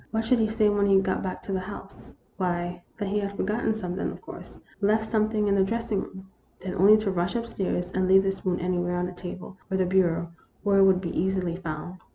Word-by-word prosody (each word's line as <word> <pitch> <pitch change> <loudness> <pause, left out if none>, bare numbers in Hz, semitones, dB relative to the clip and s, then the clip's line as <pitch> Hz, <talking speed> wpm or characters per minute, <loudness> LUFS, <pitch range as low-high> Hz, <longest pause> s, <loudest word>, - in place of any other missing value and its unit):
What 225 0 -1
should 245 +1 +3
he 220 - +3
say 220 0 +2
when 205 -1 +2
he 195 -1 +6
got 190 -1 -1
back 185 - -5
to - - -6
the 190 - 0
house? 195 +1 -10 0.3
Why, 175 -1 -2 0.2
that 205 -3 -3
he 210 +1 +1
had 200 0 -4
for - - 0
gotten 220 +2 0
something, 185 -3 -3
of - - -9
course; - - -11 0.2
left 215 +2 +2
something 215 -1 +1
in 200 - +3
the 195 -1 +4
dressing 230 0 -1
room. 190 0 -10 0.3
Then 185 -1 -5
only 200 +3 +6
to 215 -2 -1
rush 180 +1 -1
up 235 0 -1
stairs, 180 -5 -2
and 185 0 0
leave 190 +1 +6
the 195 - +1
spoon 185 -2 -2
anywhere 180 0 -1
on 180 - 0
the 180 - -4
table 180 +1 -8
or 190 - 0
the 185 - +2
bureau 175 -2 +1 0.3
where 200 -1 +3
it 195 - +7
would 190 -1 +4
be 170 - -4
easily 185 -2 0
found. 175 +1 -6
190 Hz, 240 wpm, -26 LUFS, 180-210 Hz, 0.3 s, it